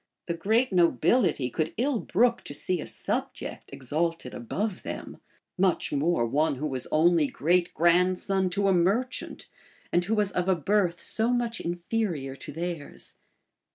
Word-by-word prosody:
The 170 - -2
great 220 +7 +1
nobility 170 - +2
could 155 +4 -2
ill 255 +1 +1
brook 235 +6 +2
to 145 - -5
see 180 +1 -1
a - - -6
subject - - -4
exalted 155 +1 -2
above 185 - -3
them; - - -7 0.4
much 185 -5 +1
more 145 -2 +1
one 145 +5 +1
who 140 +4 -4
was 130 -4 -3
only 160 -1 +4
great 175 +5 +1
grandson 180 +3 +2
to 200 +2 0
a 195 - +4
merchant, 200 +9 0 0.5
and 175 - +2
who 215 +5 0
was 205 -2 +1
of 180 +1 -1
a 190 - +4
birth 175 +1 +1
so 225 +2 0
much 240 -2 0
inferior 175 -5 -2
to - - -9
theirs. 165 -1 -6
175 Hz, 155 wpm, -27 LUFS, 155-205 Hz, 0.5 s, only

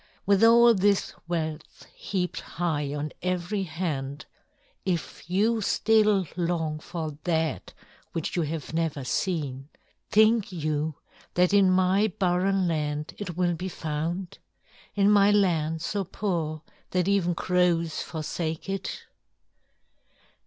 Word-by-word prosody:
With 200 +1 +4
all 235 +1 +7
this 200 -1 +2
wealth 160 -3 -4
heaped 180 -3 -3
high 155 -5 -2
on 150 +1 -3
every 180 +3 -1
hand, 155 -5 -4 0.6
if 175 -2 -3
you 220 +5 +2
still 210 -2 +3
long 165 -3 -1
for 155 -3 -6
that 160 -2 -1 0.4
which 165 - -3
you 175 - +1
have 155 0 -4
never 160 -4 -1
seen, 140 -2 -2 0.4
think 220 -1 +4
you 155 -2 -2 0.4
that 180 +2 +3
in 200 -2 +6
my 185 +3 +3
barren 185 +1 +2
land 150 -2 -2
it 180 -5 -5
will 175 -1 +2
be 180 +3 -4
found? 165 +3 -4 0.6
In 200 -1 +3
my 200 -1 +6
land 165 -6 +2
so 205 -1 -1
poor 165 -5 -3 0.3
that 180 -1 0
even 190 -3 +2
crows 175 -3 +1
forsake 160 +1 -4
it?" 195 -1 -4
175 Hz, 120 wpm, -27 LUFS, 155-195 Hz, 0.6 s, all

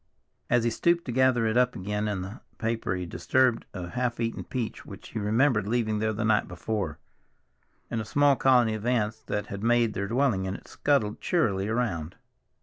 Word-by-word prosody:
As 120 -1 +3
he 120 - +1
stooped 170 +8 +1
to 125 - -3
gather 130 -2 +3
it 110 +1 +1
up 125 0 +3
again 105 +1 -2
in 100 -3 -2
the 100 +7 -8 0.2
paper 115 -4 -1
he 90 -1 -3
disturbed 130 +7 +1
a 90 -2 -6
half 125 0 -2
eaten 115 -1 -2
peach 125 -4 -4
which - - -11
he 115 - -4
remembered 110 +1 +2
leaving 110 -2 0
there 110 0 +1
the 110 +1 -2
night 110 -1 +2
before, 90 -3 -3 0.9
and 115 - -1
a - - -4
small 140 +5 +3
colony 125 -2 +4
of 110 -1 -5
ants 110 -2 0
that 105 -1 -3
had 100 0 -7
made 115 -1 +3
their 100 0 -2
dwelling 120 -5 +1
in 95 0 -3
it - - -11
scuttled 125 -8 0
cheerily 105 - +1
around. 105 -9 -2
110 Hz, 195 wpm, -27 LUFS, 105-125 Hz, 0.9 s, colony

